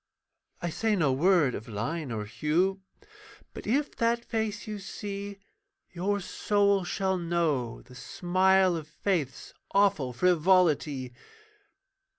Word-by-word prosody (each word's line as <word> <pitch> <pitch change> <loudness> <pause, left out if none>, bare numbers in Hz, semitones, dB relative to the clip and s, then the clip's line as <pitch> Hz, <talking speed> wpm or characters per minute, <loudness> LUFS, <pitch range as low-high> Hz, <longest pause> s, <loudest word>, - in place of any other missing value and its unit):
I 175 - -1
say 220 +5 +1
no 150 -8 +2
word 160 -2 +3
of 110 - -6
line 125 +7 -3
or 105 -2 -3
hue, 160 - 0 0.7
But - - -9
if 280 +6 0
that 235 0 +1
face 220 -2 -2
you 215 -1 -5
see, 200 +1 -6 0.5
Your 200 +3 -1
soul 200 0 +1
shall 190 +1 -1
know 165 -9 -1
the 125 - -16
smile 185 +6 +2
of 160 -2 -5
faith's 155 -4 -2 0.2
Awful 195 -10 +3
frivolity. 155 -4 +2
180 Hz, 120 wpm, -28 LUFS, 150-200 Hz, 0.7 s, word